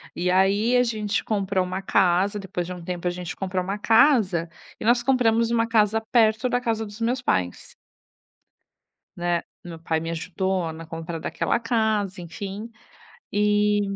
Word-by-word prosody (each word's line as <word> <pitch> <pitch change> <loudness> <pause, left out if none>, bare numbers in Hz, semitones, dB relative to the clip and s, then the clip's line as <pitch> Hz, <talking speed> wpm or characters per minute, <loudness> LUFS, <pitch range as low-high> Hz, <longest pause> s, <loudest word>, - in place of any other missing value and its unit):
E 180 +1 0
aí 200 +6 +3
a 245 - +5
gente 215 -2 -1
comprou 195 -3 0
uma 185 +1 -4
casa, 195 +2 +2
depois 180 -2 -4
de 180 - -6
um 175 -1 -9
tempo 180 0 -4
a - - +1
gente 180 -1 -6
comprou 185 -1 -2
uma 195 +3 -3
casa, 215 - +3 0.3
e - - -6
nós 240 +1 +4
compramos 235 -3 +2
uma 230 -1 +2
casa 220 -1 +3
perto 220 0 +3
da 245 0 0
casa 225 -2 -1
dos 205 +2 -11
meus 245 +2 0
pais. 90 - -2 1.4
Né, 175 -1 -1 0.2
meu 170 -2 -9
pai 160 -1 -1
me 165 +1 -5
ajudou 180 0 -2
na 165 +1 -9
compra 165 0 -6
daquela - - -1
casa, 220 -5 0
enfim, 200 +6 -7 0.6
e 210 0 +2
200 Hz, 165 wpm, -24 LUFS, 180-225 Hz, 1.4 s, a